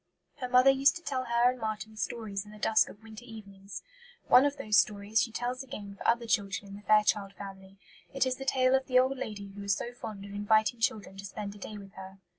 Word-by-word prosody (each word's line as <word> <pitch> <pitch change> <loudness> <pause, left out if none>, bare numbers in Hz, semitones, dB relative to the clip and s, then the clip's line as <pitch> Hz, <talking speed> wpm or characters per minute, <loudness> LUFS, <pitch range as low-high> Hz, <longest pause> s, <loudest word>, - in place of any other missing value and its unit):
Her 250 - -4
mother 255 +2 +7
used 275 +3 +4
to 335 - -8
tell 260 -4 -2
her 235 +1 +3
and 255 - -9
Marten 220 -1 -4
stories 215 -3 -4
in 210 - -15
the 215 - -12
dusk 215 +1 +3
of 210 - -14
winter 220 +1 -11
evenings; 200 -4 -10 0.4
one 255 +3 +7
of 285 0 0
those 210 0 +3
stories 210 +1 +1
she 230 - -1
tells 245 +3 -3
again 210 -7 -8
for - - -5
other 235 0 +2
children 200 -2 -1
in 195 - -8
the 205 - -10
Fairchild 210 -1 +3
Family. 195 -1 -10 0.3
It 270 -1 +1
is 255 -1 -1
the 270 - -6
tale 255 -1 +3
of 265 0 +2
the 255 - +3
old 260 +1 +3
lady 205 -5 -5
who 200 +1 -10
was 200 0 +1
so 240 - -5
fond 215 -4 -8
of 200 - -10
inviting 215 +3 +2
children 210 -4 -1
to 195 - -8
spend 200 0 -6
a 205 - -13
day 210 +2 -7
with 195 -1 -12
her. 190 0 -10
215 Hz, 240 wpm, -30 LUFS, 200-250 Hz, 0.4 s, mother